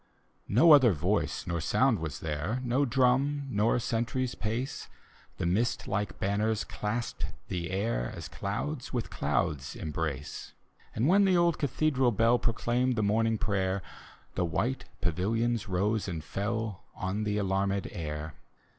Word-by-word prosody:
No 160 +11 +6
other 130 -8 +8
voice 90 +7 0
nor 85 -2 -2
sound 125 +6 +3
was 75 -4 -5
there. 80 - -2
No 130 +3 +2
drum 135 +3 +2
nor 105 +2 +2
sentry's 120 +2 -1
pace, 120 +6 -3 0.5
The - - -2
mist 105 +8 0
like 100 +1 -2
banners 105 +2 +1
clasped 115 +3 -3 0.2
the 85 -2 -3
air 95 - -1
As - - -6
clouds 120 +7 -4
with 120 -3 -3
clouds 70 0 -1
embrace. 75 -3 -4 0.4
And 115 +5 +2
when 195 +4 +5
the 185 -2 +4
old 170 -1 +3
cathedral 140 -2 +2
bell 115 +2 +3
Proclaimed 120 +2 +1
the 110 - +1
morning 110 +2 +2
prayer, 95 -3 0 0.5
The 90 - 0
white 125 +10 -1 0.2
pavilions 110 +5 0
rose 100 +4 0
and 85 -4 -4
fell 105 +3 -3
On 95 +3 -2
the 105 0 0
alanned 100 0 0
air. 75 -1 -5
110 Hz, 140 wpm, -30 LUFS, 95-120 Hz, 0.5 s, other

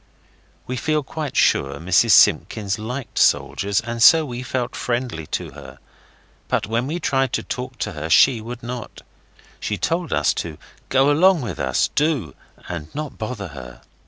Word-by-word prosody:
We 125 - -4
feel 155 +2 0
quite 150 +1 -5
sure 70 +1 +2
Mrs 95 +7 +3
Simpkins 100 +1 +3
liked 125 +4 -5
soldiers, 100 0 +2
and 120 0 -5
so 160 +6 +7
we 125 -3 -6
felt 125 -1 -3
friendly 120 -11 -3
to - - -4
her. 70 -2 -12 0.7
But - - 0
when 115 +5 -1
we 165 +4 -3
tried 135 -5 0
to - - -1
talk 125 0 -6
to 105 - -3
her 80 -2 -6
she 120 +6 +5
would 115 +2 -8
not. 120 -1 -7 0.6
She 105 - -3
told 165 - -1
us - - +2
to 80 -2 -8 0.3
go 135 +2 +4
along 175 +3 +4
with 115 - -5
us, 65 -1 +1
do, 140 - 0 0.3
and 80 -4 -5
not 150 -1 -5
bother 110 -4 -5
her. 60 -4 -11
120 Hz, 165 wpm, -21 LUFS, 95-135 Hz, 0.7 s, so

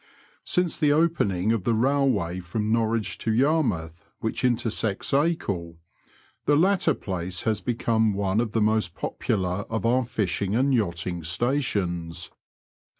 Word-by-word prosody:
Since 180 -2 0
the 150 -1 +3
opening 130 - +2
of 115 -5 0
the 115 - +1
railway 120 -8 +1
from 105 +5 -3
Norwich 110 -3 0
to 110 - -1
Yarmouth 110 - +1 0.2
which 110 - -3
intersects 115 -4 0
Acle, 100 - 0 0.7
the 145 - +5
latter 175 -2 +3
place 90 -2 -4
has 110 -2 0
become 110 -3 +1
one 100 +2 +1
of 110 -3 -3
the 115 - +1
most 110 -5 +1
popular 90 -3 -2
of 115 0 -2
our 125 +2 +3
fishing 100 -3 -1
and 135 +3 +2
yachting 90 -6 -1
stations. 90 - -1
110 Hz, 135 wpm, -25 LUFS, 90-130 Hz, 0.7 s, the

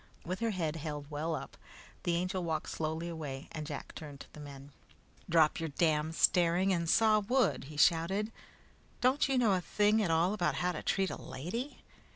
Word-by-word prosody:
With 185 +2 -3
her 230 - 0
head 165 -6 -2
held 150 -2 -5
well 155 +2 -1
up, 140 - -8 0.4
the 175 - 0
Angel 185 +1 -1
walked 160 -2 -2
slowly 160 +1 -3
away, 150 -5 -6
and 155 -1 -5
Jack 145 -3 -6
turned 145 -3 -9
to - - -13
the - - -11
men. 140 -1 -10 0.6
"Drop 160 -2 +4
your 165 -1 -2
damned 155 +1 +1
staring 180 +3 +3
and 170 -2 -1
saw 215 +1 +5
wood," 245 - +1
he 150 +1 -10
shouted. 190 +7 +3 0.7
"Don't 265 +3 +3
you 270 - +2
know 235 -4 +4
anything 205 +4 +2
at 195 - 0
all 165 +4 +3
about 180 -5 0
how 180 0 0
to 160 - -5
treat 195 -1 0
a - - -6
lady?" 190 - -5
170 Hz, 190 wpm, -32 LUFS, 155-195 Hz, 0.7 s, saw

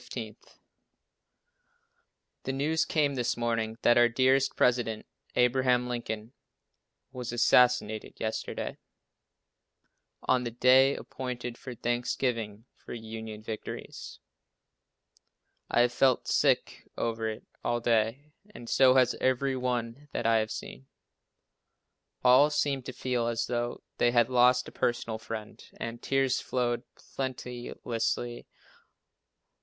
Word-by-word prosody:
The - - -1
news 150 +4 +1
came 145 -3 +1
this 125 -3 -1
morning 115 -1 -1
that 120 0 +5
our 120 0 +6
dear 130 +2 +4 0.2
president, 120 -3 +1 0.3
Abraham 125 0 +3
Lincoln, 115 -1 -5 0.8
was 125 -2 -5
assassinated 120 -3 +3
yesterday, 110 0 -4 1.4
on 130 -1 +2
the 120 - -2
day 130 +3 +5
appointed 125 -2 -6
for 130 0 -9
thanksgiving 120 -2 -2
for - - -9
Union 110 -1 -7
victories. 110 -1 -7 1.5
I - - +3
have 120 0 +2
felt 130 -1 +2
sick - - +1
over 115 -1 -1
it 110 - -7 0.2
all 120 0 0
day 120 +5 0 0.2
and 120 - -10
so 130 +1 +5
has 125 -2 +4
every 130 +1 +1
one 125 +2 -3
that - - -2
I 115 0 +4
have 110 0 0
seen. 65 -10 -8 1.4
All 130 +4 +6
seem 145 -2 0
to 130 - -7
feel 125 -2 -1
as 115 0 -1
though 120 0 -3 0.2
they 120 - +4
had 120 -1 +3
lost 125 0 +4
a - - -9
personal 115 -2 -1
friend, 110 -1 -7 0.2
and 115 0 -5
tears 135 -1 +1
flow 120 -2 -1
plenteously. 120 -2 -4
120 Hz, 115 wpm, -29 LUFS, 115-130 Hz, 1.5 s, our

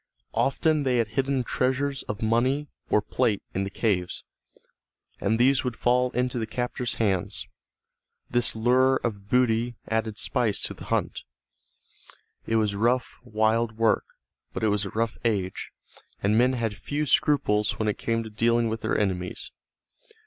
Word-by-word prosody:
Often 155 +3 +2
they 130 -3 +1
had 115 -2 +1
hidden 135 +2 0
treasures 135 +3 0
of 105 +2 -4
money 130 +6 +2 0.2
or 105 - +3
plate 115 -5 0
in 95 +1 -1
the - - -4
caves, 95 -4 -1 1.0
and 110 +3 +1
these 130 +3 +4
would 125 -3 -2
fall 125 +2 +2
into 125 0 0
the 110 - -2
captors' 125 0 -3
hands. 95 -5 -1 0.8
This 120 -2 0
lure 130 +4 +4
of 100 -4 -4
booty 120 -1 +2
added 110 -1 -1
spice 120 -4 +1
to - - -2
the - - -11
hunt. - - -1 1.3
It 115 - +1
was 105 -2 +2
rough, 120 +5 0
wild 110 +1 +1
work, 115 -1 +2 0.5
but - - -4
it 110 - +3
was 105 0 +1
a - - -4
rough 115 +2 -2
age, 100 -5 -1 0.5
and 100 +2 +3
men 125 +3 +4
had 115 -4 -2
few 145 +8 -3
scruples 105 -7 +2
when 110 - -1
it 105 - -1
came 115 0 0
to 110 - -9
dealing 115 +1 +2
with 110 0 -3
their - - 0
enemies. 90 -3 -2
115 Hz, 155 wpm, -26 LUFS, 105-125 Hz, 1.3 s, these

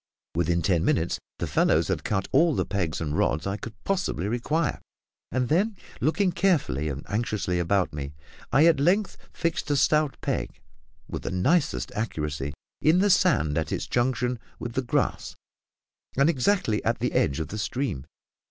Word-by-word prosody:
Within 85 0 +1
ten 90 -4 +2
minutes, 85 +1 +1 0.2
the - - -2
fellows - - +2
had - - -1
cut 95 -2 -1
all 160 +2 +4
the - - 0
pegs 90 -6 -2
and 75 -2 -2
rods 80 - +1
I 95 0 -1
could 110 +1 -8
possibly 180 - -1
require; 145 +8 -1 0.5
and 125 0 0
then, 195 - +1 0.2
looking 180 +5 +2
carefully 155 - +1
and 70 0 -6
anxiously 100 -4 -1
about 90 +1 +1
me, 75 0 -5 0.4
I 145 +4 +5
at 165 -4 +5
length 185 +7 +2 0.2
fixed 165 -2 -2
a 145 - +2
stout 150 +1 +2
peg, - - -3 0.5
with - - -5
the - - -4
nicest 145 - +1
accuracy, 75 -9 -3 0.3
in 160 +3 +4
the 200 +2 +4
sand 120 - +3
at 80 - -3
its - - -2
junction 125 0 0 0.2
with 120 - -6
the 130 - 0
grass, 125 - -1 0.8
and 140 +4 +5
exactly 135 - +1
at - - +1
the - - -1
edge 70 +3 +1
of 80 - -3
the 105 - -5
stream. 105 - -2
120 Hz, 170 wpm, -26 LUFS, -, 0.8 s, I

